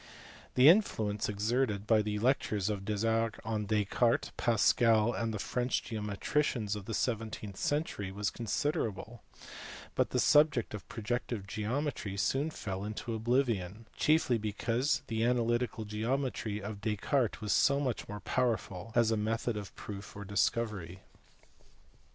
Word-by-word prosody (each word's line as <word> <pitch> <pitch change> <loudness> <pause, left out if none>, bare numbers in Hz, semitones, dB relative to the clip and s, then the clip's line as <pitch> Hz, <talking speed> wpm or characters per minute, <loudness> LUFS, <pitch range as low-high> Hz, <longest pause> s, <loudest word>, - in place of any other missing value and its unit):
The 130 +2 +7
influence 110 - +3
exerted 105 0 0
by 110 0 +4
the 105 0 -2
lectures 110 -4 +1
of 100 -2 -4
Desargues 110 +1 0
on 110 -2 -2
Descartes, 110 +3 +1
Pascal, 115 0 +3
and 115 0 -1
the 105 - -3
French 125 +5 -1
geometricians 105 +1 -1
of 105 -2 -7
the 115 - -3
seven 115 -2 -1
teenth 100 -2 -8
century 145 -10 -1
was 105 +1 -2
considerable; 115 - -2 0.7
but - - +1
the - - 0
subject 145 -7 +4
of 105 - -8
projective 115 -2 -3
geometry 110 0 -3
soon 135 +9 +1
fell 95 -10 -5
into 110 +3 -4
oblivion, 115 -3 0
chiefly 150 -6 +3
because 120 +7 0
the 115 -2 -1
analytical 120 -2 +1
geometry 110 -1 -2
of 100 0 -6
Descartes 110 +4 0
was 105 -2 0
so 140 0 +4
much 130 -8 -2
more 105 0 -6
powerful 115 -5 -1
as 115 -2 +4
a - - +3
method 110 +2 -1
of 100 -2 -7
proof 100 -1 -8
or 100 0 -7
discovery. 100 -2 -1
110 Hz, 140 wpm, -32 LUFS, 105-120 Hz, 0.7 s, The